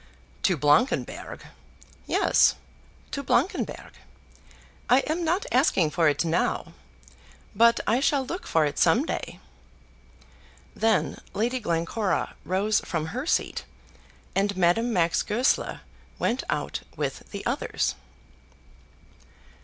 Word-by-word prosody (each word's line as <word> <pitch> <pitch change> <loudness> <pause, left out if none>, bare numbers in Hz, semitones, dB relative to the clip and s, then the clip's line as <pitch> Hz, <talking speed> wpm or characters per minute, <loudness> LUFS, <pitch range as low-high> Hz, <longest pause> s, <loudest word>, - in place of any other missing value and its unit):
"To 180 - +2
Blankenberg!" 150 - +1 0.6
"Yes; - - +4 0.6
to 280 - -3
Blankenberg. 280 - -1 1.0
I 255 +2 +6
am 320 +5 -2
not 350 +5 0
asking 195 - +3
for 160 0 +3
it 150 - 0
now. 165 +1 -1 0.8
But 235 +2 +5
I 230 +4 +2
shall 275 -1 +1
look 350 +7 -6
for 160 -2 +3
it 145 - -3
some 225 - +4
day." - - -5 1.4
Then 225 -1 +1
Lady 235 +6 0
Glencora 180 +1 -1
rose 195 +5 +1
from 160 -3 -3
her 255 +5 -4
seat, - - 0 0.7
and 200 0 +1
Madame 190 +7 +2
Max 170 -5 +2
Goesler 235 +5 0 0.4
went 245 +3 0
out - - -2 0.2
with - - -4
the - - -7
others. - - -1
220 Hz, 110 wpm, -26 LUFS, 170-260 Hz, 1.4 s, I